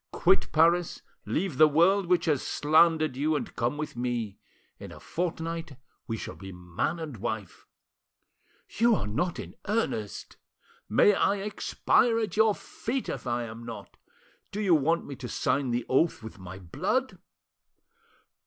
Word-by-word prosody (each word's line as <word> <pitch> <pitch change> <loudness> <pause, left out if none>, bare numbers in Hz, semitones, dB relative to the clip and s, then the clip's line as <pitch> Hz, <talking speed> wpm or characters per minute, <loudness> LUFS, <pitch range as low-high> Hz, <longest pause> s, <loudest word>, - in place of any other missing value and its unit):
Quit 190 +2 +2
Paris, 170 +2 +3 0.2
leave 170 -6 -2
the 155 - +9
world 175 +6 +3
which 175 -1 +2
has 150 -5 +2
slandered 155 -1 +3
you, 150 +3 +1
and - - -4
come 120 +4 -1
with 150 -4 -5
me. 120 -4 -3 0.4
In - - -9
a - - -11
fortnight 165 -4 -4 0.3
we 115 - -2
shall - - -6
be 95 -1 -9
man 90 - -3
and 155 -7 -6
wife." 110 -3 -5 1.0
"You 235 +1 +3
are - - -2
not 160 - -1
in - - -7
earnest!" 195 - -2 0.5
"May 160 - +5
I 200 - +2
expire 210 +3 +1
at 215 -6 -2
your 220 -1 +4
feet 255 +3 -4
if - - -5
I 120 0 0
am 115 0 -8
not! 115 -1 -9 0.6
Do 205 - -4
you 195 -5 +3
want 165 +2 +2
me 140 - -7
to 125 -2 -7
sign 130 +3 0
the 120 0 -1
oath 135 -2 +2
with 110 -1 -9
my 95 0 -9
blood?" 90 -3 -2
155 Hz, 155 wpm, -28 LUFS, 120-175 Hz, 1.0 s, the